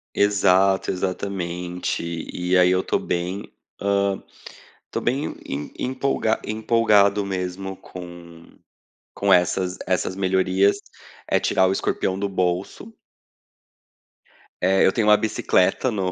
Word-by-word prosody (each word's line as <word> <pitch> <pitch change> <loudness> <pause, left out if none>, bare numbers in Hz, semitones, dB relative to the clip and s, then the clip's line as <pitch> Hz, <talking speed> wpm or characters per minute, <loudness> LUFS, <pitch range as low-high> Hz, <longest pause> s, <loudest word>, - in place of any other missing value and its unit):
Exato, 95 -1 +3
exatamente. 90 -2 -3 0.3
E 90 +1 0
aí 90 0 +5
eu 95 0 +2
tô - - 0
bem, 90 +3 -4 0.3
hã, 100 -1 0 0.7
tô - - -3
bem 135 +5 -2
em 70 +2 -5
em - - -2
empolga 130 -4 0
empolgado 105 -2 +3
mesmo 95 0 -4
com 85 -2 -12 0.6
com 100 -1 +2
essas 90 +1 +1
essas 95 0 0
melhorias. 95 +1 +2 0.5
É - - +2
tirar 95 - +2
o - - +1
escorpião 95 0 -1
do 100 - -1
bolso. 95 - -2 1.7
Eh, 95 +2 +3
eu - - +4
tenho 110 0 0
uma 105 0 +7
bicicleta 105 +1 +1
no 95 -5 -1
95 Hz, 120 wpm, -23 LUFS, 90-100 Hz, 1.7 s, uma